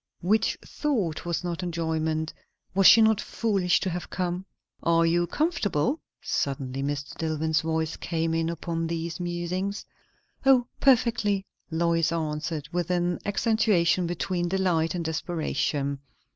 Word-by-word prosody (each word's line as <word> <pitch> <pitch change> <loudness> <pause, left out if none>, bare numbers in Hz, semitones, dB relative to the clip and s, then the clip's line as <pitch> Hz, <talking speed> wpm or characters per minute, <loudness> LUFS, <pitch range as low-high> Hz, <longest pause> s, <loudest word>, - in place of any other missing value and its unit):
Which 210 +5 +2
thought 215 - -1
was 170 +1 -1
not 175 0 -3
enjoyment. 160 -2 -1 0.4
Was 195 0 +6
she 225 - +9
not 220 -1 +4
foolish 195 -6 +1
to 190 - -1
have 175 -1 -5
come? 180 +1 -3 0.3
"Are 165 0 +3
you 175 +1 +2
comfortable?" 275 - 0 0.2
suddenly 135 -1 -2
Mr. 145 0 -3
Dillwyn's 160 -1 0
voice 160 0 -1
came 165 -1 -1
in 165 0 0
upon 165 0 -3
these 165 0 -3
musings. 180 +3 -3 0.6
"O, 265 -3 +5
perfectly!" 225 -6 +3 0.2
Lois 165 0 +1
answered, 155 -1 -2
with 175 -1 -1
an 175 -1 0
accentuation 205 -5 +2
between 175 +1 -1
delight 180 -3 +1
and 170 -2 -3
desperation. 155 -3 -1
170 Hz, 130 wpm, -27 LUFS, 160-190 Hz, 0.6 s, she